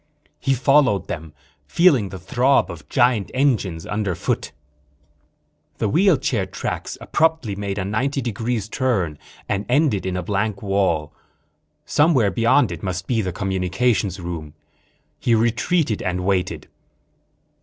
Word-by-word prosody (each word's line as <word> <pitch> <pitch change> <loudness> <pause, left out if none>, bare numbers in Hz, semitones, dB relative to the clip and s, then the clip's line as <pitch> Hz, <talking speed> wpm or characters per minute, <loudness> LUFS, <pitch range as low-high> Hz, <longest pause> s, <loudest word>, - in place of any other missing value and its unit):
He 135 - +1
followed 130 -5 +3
them, 80 -1 -6 0.4
feeling 140 - +4
the 95 - -7
throb 125 +9 +2
of - - -11
giant 120 -6 +2
engines 110 - +1
underfoot. 105 -4 -2 1.3
The - - 0
wheelchair 145 - +2
tracks - - -4
abruptly 160 -10 0
made 100 0 -4
a 95 - -2
ninety 130 +8 -1
degree 120 -1 -2
turn 100 - -1 0.3
and 100 0 -1
ended 125 -8 +2
at 95 - -2
a 90 - -2
blank 100 +2 -2
wall. 95 -7 0 0.7
Somewhere 145 -10 +3
beyond 115 +3 +3
it 85 - -6
must 90 -1 -3
be 115 0 0
the 95 -3 -2
communications 95 +2 0
room. 80 -4 -6 0.6
He 115 - +2
retreated 120 - +1
and 90 0 -2
waited. 95 -2 -1
105 Hz, 125 wpm, -22 LUFS, 95-125 Hz, 1.3 s, feeling